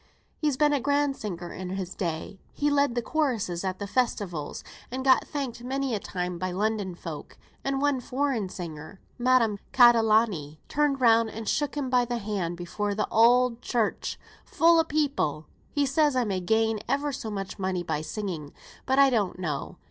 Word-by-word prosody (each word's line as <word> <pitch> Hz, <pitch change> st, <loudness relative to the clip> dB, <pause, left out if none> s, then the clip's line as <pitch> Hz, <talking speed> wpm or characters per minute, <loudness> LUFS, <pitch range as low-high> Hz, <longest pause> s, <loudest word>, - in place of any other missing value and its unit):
He's 295 Hz, -4 st, 0 dB
been 295 Hz, 0 st, +4 dB
a 285 Hz, -, +2 dB
grand 285 Hz, +1 st, +1 dB
singer 175 Hz, -7 st, -6 dB
in 185 Hz, 0 st, -6 dB
his 185 Hz, -1 st, -4 dB
day. 170 Hz, +2 st, -4 dB
He's 295 Hz, 0 st, 0 dB
led 280 Hz, -4 st, +2 dB
th' 240 Hz, -, -1 dB
chorusses 230 Hz, -, -1 dB
at 185 Hz, -1 st, -2 dB
the 205 Hz, -, -4 dB
Festivals, 200 Hz, -, -2 dB, 0.3 s
and 260 Hz, +2 st, -4 dB
got 260 Hz, -1 st, +5 dB
thanked 260 Hz, -5 st, -4 dB
many 265 Hz, 0 st, -2 dB
a 210 Hz, -, 0 dB
time 180 Hz, -2 st, -4 dB
by 185 Hz, +1 st, -2 dB
London 200 Hz, 0 st, -1 dB
folk; 165 Hz, -3 st, -8 dB, 0.3 s
and 275 Hz, 0 st, -1 dB
one 285 Hz, -2 st, +2 dB
foreign 250 Hz, -5 st, -1 dB
singer, 170 Hz, +1 st, -8 dB, 0.2 s
Madame 240 Hz, -4 st, +3 dB
Catalani, 220 Hz, -, +4 dB
turned 290 Hz, -2 st, +1 dB
round 230 Hz, -2 st, +5 dB
and 220 Hz, 0 st, -7 dB
shook 290 Hz, 0 st, 0 dB
him 265 Hz, -3 st, -2 dB
by 250 Hz, -1 st, +4 dB
th' 240 Hz, -, -4 dB
hand 195 Hz, -5 st, -3 dB
before 200 Hz, +4 st, -3 dB
the 210 Hz, 0 st, 0 dB
Oud 240 Hz, +1 st, +4 dB
Church 235 Hz, -4 st, -1 dB, 0.3 s
full 335 Hz, 0 st, +4 dB
o' -, -, +5 dB
people. 285 Hz, -, -1 dB, 0.2 s
He 290 Hz, -1 st, +1 dB
says 290 Hz, +1 st, +2 dB
I 250 Hz, -, +3 dB
may 195 Hz, -4 st, -1 dB
gain 220 Hz, +3 st, +1 dB
ever 285 Hz, +1 st, 0 dB
so 230 Hz, -4 st, -5 dB
much 195 Hz, -1 st, -5 dB
money 185 Hz, -2 st, -1 dB
by 150 Hz, -, -2 dB
singing; 160 Hz, -3 st, -5 dB, 0.3 s
but 265 Hz, +1 st, +2 dB
I 275 Hz, -1 st, +6 dB
don't 205 Hz, -7 st, 0 dB
know. 155 Hz, -6 st, -4 dB
225 Hz, 180 wpm, -27 LUFS, 185-270 Hz, 0.3 s, I